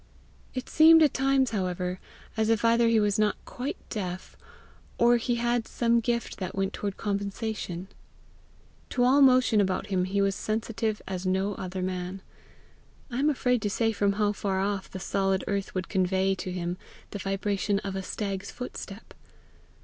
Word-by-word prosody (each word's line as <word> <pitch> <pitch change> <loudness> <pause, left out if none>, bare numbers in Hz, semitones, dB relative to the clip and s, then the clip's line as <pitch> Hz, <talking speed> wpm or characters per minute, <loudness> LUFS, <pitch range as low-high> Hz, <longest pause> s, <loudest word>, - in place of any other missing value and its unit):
It 255 - -4
seemed 320 +1 +7
at 300 - +3
times, 270 -1 +2
however, 180 -2 -2 0.4
as 220 -1 +1
if 225 0 +2
either 230 0 +4
he 230 -1 +4
was 205 -1 +1
not 210 -1 +3
quite 255 +3 -5
deaf, 185 -4 -5 0.6
or 240 0 +5
he 240 +1 -1
had 240 -1 0
some 235 0 +2
gift 235 0 -2
that 185 -2 -4
went 195 0 -1
toward 200 -2 -4
compensation. 200 -3 -3 1.0
To 245 - +1
all 265 +3 +5
motion 255 -5 +5
about 190 +1 -1
him 180 -1 +2
he 195 +2 -1
was 195 0 +2
sensitive 215 +1 -2
as 185 -1 -3
no 190 +2 +1
other 185 -1 -5
man. 185 +1 -4 0.9
I 245 - -2
am 290 +2 +3
afraid 250 -4 +1
to 205 - 0
say 225 +2 +1
from 200 -2 +1
how 205 0 +1
far 195 -2 -2
off 195 0 -2
the 190 - -7
solid 195 0 0
earth 200 -1 -2
would 185 -2 -2
convey 190 0 +1
to 185 -1 -5
him 175 0 -3 0.3
the 205 - -5
vibration 195 +1 -1
of 195 -2 -4
a 190 - -2
stag's 195 0 -4
footstep. 225 -4 -8
205 Hz, 170 wpm, -27 LUFS, 190-235 Hz, 1.0 s, seemed